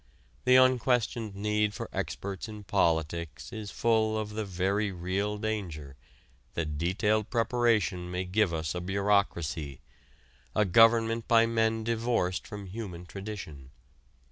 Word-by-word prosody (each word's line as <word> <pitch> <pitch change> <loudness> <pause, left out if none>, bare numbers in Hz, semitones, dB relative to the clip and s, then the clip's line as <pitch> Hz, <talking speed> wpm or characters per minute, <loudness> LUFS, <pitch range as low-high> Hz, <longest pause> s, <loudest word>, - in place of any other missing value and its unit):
The 125 - +6
unquestioned 125 -4 +3
need 105 0 0
for - - -5
experts 100 +2 -4
in 105 -1 -8
politics 85 -1 -1
is 110 -2 -6
full 110 -1 +1
of 105 -1 -3
the 110 0 -3
very 100 +2 0
real 95 +4 -2
danger 90 -10 -4 0.6
that 75 -3 -2
detailed 105 +5 +1
preparation 115 -6 +1
may 90 +1 -2
give 95 0 +2
us 80 -1 -2
a 90 - -3
bureaucracy 90 -7 0 0.8
a 105 - +3
government 115 +3 +4
by 115 -2 +5
men 115 -1 +1
divorced 115 -5 0
from 105 -1 -7
human 95 -3 -7
tradition. 90 -8 -8
105 Hz, 125 wpm, -29 LUFS, 90-110 Hz, 0.8 s, The